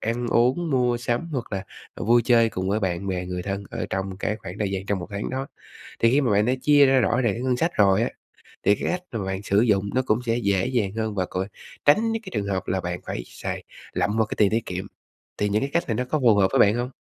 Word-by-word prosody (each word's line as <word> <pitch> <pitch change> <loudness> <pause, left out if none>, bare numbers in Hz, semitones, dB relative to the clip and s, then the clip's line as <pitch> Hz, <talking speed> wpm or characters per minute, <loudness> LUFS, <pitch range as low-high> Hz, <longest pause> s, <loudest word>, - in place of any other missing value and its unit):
ăn 120 +2 -2
uống, 130 +9 +2
mua 125 -3 +2
sắm 120 +7 -2
hoặc 125 -6 -4
là, 100 0 -3 0.3
ờ, - - -5
vui 120 +2 +4
chơi 115 -2 +5
cùng 95 -2 -3
với 105 +2 +1
bạn 95 -1 -2
bè, 90 -1 -2
người 90 0 -4
thân 100 +1 -4
ở - - -4
trong 95 0 -3
cái 105 0 -1
khoảng 95 -1 -9
thời 105 -2 -1
gian 95 0 -4
trong 100 -1 0
1 90 - -6
tháng 100 +1 -4
đó. 135 +1 -3 0.5
Thì 115 - +5
khi 140 - +4
mà 130 -5 +1
bạn 105 +1 +3
đã 125 - +2
chia 145 -1 +6
ra 135 0 +4
rõ 120 +1 +2
ràng 115 -6 +1
cái 120 - -5
ngân 130 -1 +1
sách 165 +7 0
rồi 100 0 +4
á, - - 0 0.5
thì 100 - +5
cái - - -6
cách 180 0 -3
mà 105 -4 -3
bạn 95 +1 -3
sử 100 0 +2
dụng 100 -4 +2
nó 130 - +2
cũng 110 - +2
sẽ 115 0 +1
dễ 100 -2 +1
dàng 120 -7 0
hơn 110 -1 -2
và 95 -2 -1
còn 95 +2 -3 0.4
tránh 220 +10 +4
những 225 0 -3
cái 190 - -9
trường 105 -2 -2
hợp 95 -2 -2
là 95 - 0
bạn 90 0 -4
phải - - -4
xài - - -6 0.3
lậm 105 - 0
vào 110 - +3
cái - - -5
tiền 100 -2 +4
tiết 115 0 -1
kiệm. 90 +2 -4 0.5
Thì 105 0 0
những 105 +4 +1
cái 135 - -1
cách 170 - +2
này 115 - 0
nó 125 +3 -1
có 155 +4 -1
phù 120 -6 +5
hợp 95 -2 +4
với - - +2
bạn 105 +2 +5
hông? 120 +1 -2
110 Hz, 285 wpm, -24 LUFS, 100-125 Hz, 0.5 s, chia